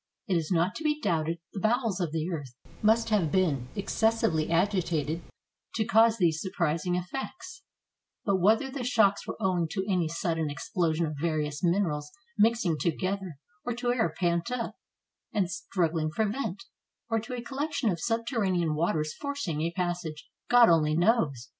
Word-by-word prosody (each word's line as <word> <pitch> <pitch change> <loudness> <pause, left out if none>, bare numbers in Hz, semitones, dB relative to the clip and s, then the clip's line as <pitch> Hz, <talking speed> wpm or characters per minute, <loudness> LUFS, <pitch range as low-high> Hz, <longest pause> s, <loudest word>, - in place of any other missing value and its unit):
It 185 - +1
is 160 -2 0
not 175 +2 +2
to 320 - -7
be 300 -1 +1
doubted 165 - 0 0.2
the 200 - -4
bowels 220 -1 +1
of 170 -4 -1
the 160 0 -1
earth 140 -7 -5 0.3
must 225 +2 +3
have 195 -8 +2
been 145 -10 +1
excessively 200 -6 +1
agitated 170 -3 +1 0.5
to 220 - +1
cause 225 +2 +5
these 165 -5 +2
sur 190 - -3
prising 170 0 +1
effects; 355 - -5 0.6
but 200 -2 +3
whether 220 +8 +3
the 265 -2 -4
shocks 220 -5 +3
were - - -4
owing 185 -5 +1
to 190 -2 -1
any 180 -5 +1
sudden 165 -1 -1
explosion 165 +2 -1
of 155 -2 -5
various 155 -2 -1
minerals 170 -5 +1 0.3
mixing 210 -7 +2
to 175 - +2
gether, 185 -2 -3 0.3
or 245 - -2
to 245 0 0
air 225 -10 +1
pent 170 +1 +1
up, 250 -2 -2 0.6
and 200 -5 +1
strugghng 170 -3 -1
for 215 +6 +1
vent, 205 -4 -3 0.4
or 225 -1 +1
to 240 +3 -6
a 240 - -5
collection 270 -3 -1
of 170 - -3
subterranean 215 - 0
waters 155 -1 0
forcing 280 - -3
a 165 +1 0
passage, 175 -4 -3 0.2
God 245 -1 +7
only 155 -2 +4
knows. 165 - +2
180 Hz, 165 wpm, -28 LUFS, 165-225 Hz, 0.6 s, God